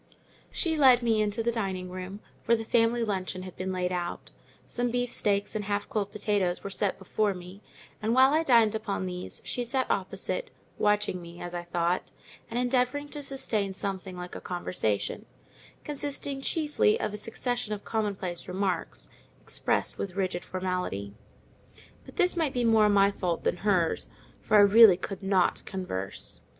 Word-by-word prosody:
She 325 -3 0
led 255 -3 +7
me 225 -2 +3
into 210 +2 0
the 235 - +1
dining 190 -5 -2
room, 185 +2 -7 0.3
where 235 - +5
the 225 - -5
family 230 +1 +3
luncheon 185 -3 -2
had 185 -1 -9
been 190 0 -3
laid 180 -1 -1
out. 175 -1 -4 0.3
Some 245 0 -1
beefsteaks 230 -4 0
and 210 -2 -2
half 205 0 -1
cold 205 -2 -1
potatoes 205 -4 0
were 200 - -5
set 200 0 0
before 200 +1 0
me; 180 +3 -10 0.4
and 220 +2 +1
while 265 +2 +6
I 315 - +4
dined 235 -8 +5
upon 205 -3 -2
these, 180 0 -6
she 245 - -1
sat 260 +2 0
opposite, 205 - -2 0.3
watching 210 -3 +1
me 170 0 -11
(as 175 0 -6
I 175 0 -4
thought) 175 +1 -1 0.4
and 235 - -3
endeavouring 250 +3 +1
to 295 - -4
sustain 220 -8 -1
something 190 -2 -4
like 180 0 -7
a - - -6
conversation—consisting 185 - -3
chiefly 325 +10 +2
of 210 - -2
a - - -3
succession 240 +2 -2
of 205 -1 -4
commonplace 200 -5 -2
remarks, 190 0 -2 0.3
expressed - - -1
with 195 - -3
frigid 185 -2 -2
formality: 180 - -3 0.9
but - - -12
this 360 -3 +2
might 320 -5 0
be 245 - +1
more 220 -2 +5
my 200 -1 +5
fault 180 -4 -2
than - - +1
hers, 185 -4 +1 0.3
for 215 - +3
I - - +9
really 205 -1 +8
could 195 +2 -5
not 190 -2 +2
converse. 140 - -5
205 Hz, 165 wpm, -28 LUFS, 185-235 Hz, 0.9 s, I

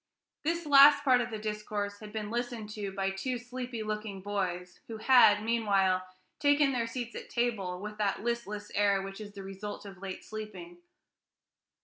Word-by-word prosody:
This 335 +2 -1
last 285 0 +8
part 255 -3 +5
of 245 - -3
the 220 - -4
discourse 210 -1 -4
had 215 -1 -10
been 210 -1 -4
listened 235 -3 -3
to 205 -2 -4
by 195 0 -1
two 245 +6 -3
sleepy 245 -1 -5
looking 210 -2 -4
boys, 185 -3 -3
who 225 - -6
had, 215 -3 +6
meanwhile, 195 -5 +2 0.3
taken 290 -1 +4
their 235 -3 -1
seats 235 0 -5
at - - -7
table 205 -7 -1
with 210 +2 -7
that 205 0 0
listless 220 -3 -3
air 200 -1 +2
which 195 +2 -7
is 205 -1 -9
the 195 - -8
result 195 +2 -7
of 195 -2 -10
late 190 -1 -6
sleeping. 220 +12 -8
215 Hz, 170 wpm, -30 LUFS, 200-240 Hz, 0.3 s, last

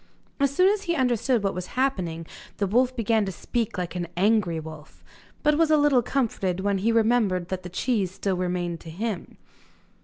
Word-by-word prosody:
As 280 0 +3
soon 365 +8 +3
as 410 0 +1
he 340 -1 0
understood 250 -3 +1
what 195 - 0
was 180 0 -5
happening, 180 -12 -1 0.3
the 200 - +1
wolf 250 +6 +2
began 225 -2 +2
to 195 - -3
speak 225 +5 -3
like 180 -1 -3
an 175 -1 -3
angry 190 -4 +2
wolf, 155 -1 -11 0.4
but 300 +1 +3
was 325 -1 +4
a 310 - +5
little 290 -4 +4
comforted 215 -8 -1
when 200 0 0
he 225 +4 +2
remembered 220 -6 +2
that 185 -1 -3
the 180 - -8
cheese 200 +1 0
still 190 +1 -2
remained 175 -2 -2
to 165 - -11
him. 200 +3 -4
205 Hz, 190 wpm, -25 LUFS, 180-250 Hz, 0.4 s, a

